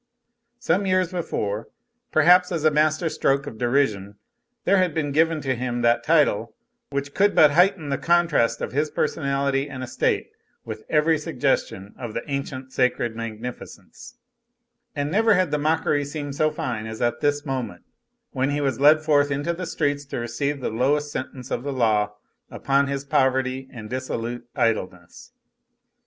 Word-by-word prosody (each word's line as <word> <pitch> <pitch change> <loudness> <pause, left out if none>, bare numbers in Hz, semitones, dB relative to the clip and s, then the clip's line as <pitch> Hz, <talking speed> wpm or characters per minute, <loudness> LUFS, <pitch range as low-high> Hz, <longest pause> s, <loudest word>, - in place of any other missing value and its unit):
Some 205 -5 0
years 185 -1 +1
before, 110 - -3 0.4
perhaps 180 +3 +5
as 165 -3 -2
a 155 - +5
master 155 +2 +2
stroke 140 -3 0
of 115 -6 -8
derision, 115 -6 0 0.5
there 200 - +3
had 180 -4 +1
been 150 -3 -1
given 160 +1 +2
to 135 -2 0
him 120 -1 -3
that 120 0 +3
title - - +2 0.3
which 140 0 -4
could 205 +1 +2
but 150 -2 +7
heighten 180 -1 +3
the 140 - -1
contrast 165 -9 +2
of - - -3
his 150 +3 0
personality 140 -2 -1
and 130 -1 -6
estate 130 0 -1 0.3
with 110 -1 -7
every 155 0 +3
suggestion 100 -8 -2
of 120 -4 -6
the 115 - -2
ancient 135 -2 -5
sacred 125 -2 0
magnificence; 120 - -8 0.8
and 145 0 -2
never 220 +2 +4
had 180 -4 +1
the 150 - 0
mockery 150 -1 +1
seemed 145 0 -5
so 155 +1 +2
fine 120 -7 -4
as 110 0 -7
at 120 -1 0
this 145 +1 0
moment, 130 -10 -4 0.5
when 135 +1 0
he 145 0 -1
was 135 -4 -1
led 155 +2 +6
forth 145 -2 +3
into 145 +4 -1
the 180 +1 -5
streets 145 -3 -1
to 140 - -6
receive 135 +4 -2
the - - -2
lowest 145 +6 0
sentence 130 -2 -6
of - - -1
the 140 +2 -4
law 105 -5 +1 0.3
upon 140 +1 +1
his 140 0 -3
poverty 130 -1 0
and 110 -3 -9
dissolute 120 -2 -4
idleness. 110 - -2
140 Hz, 165 wpm, -23 LUFS, 120-155 Hz, 0.8 s, but